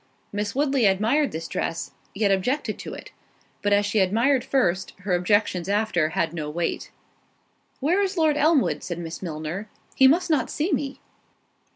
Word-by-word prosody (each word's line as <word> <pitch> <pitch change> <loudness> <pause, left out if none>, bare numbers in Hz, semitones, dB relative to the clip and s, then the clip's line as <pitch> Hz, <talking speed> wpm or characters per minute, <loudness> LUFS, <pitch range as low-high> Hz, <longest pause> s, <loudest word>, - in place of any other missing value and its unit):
Miss 205 +1 -2
Woodley 275 -5 +2
admired 225 +10 +2
this 165 +1 -5
dress, 165 - -3 0.2
yet 200 -1 +2
objected 250 +10 0
to - - -7
it; - - -11 0.5
but 205 - 0
as 205 0 +4
she 205 +1 +1
admired 230 +8 +2
first, 190 -9 0
her 190 -1 -1
objections 180 0 +1
after 205 -6 +1
had 165 -1 +1
no 155 -3 -4
weight. 165 +2 -3 0.9
"Where 345 +9 +2
is 390 -1 -1
Lord 315 -2 +3
Elmwood?" 300 -1 +2
said 175 -2 -5
Miss 165 -1 -6
Milner—"he 180 +10 -1
must 340 +5 +3
not 275 -6 +1
see 320 +6 -1
me." 275 -1 -2
205 Hz, 160 wpm, -24 LUFS, 180-275 Hz, 0.9 s, as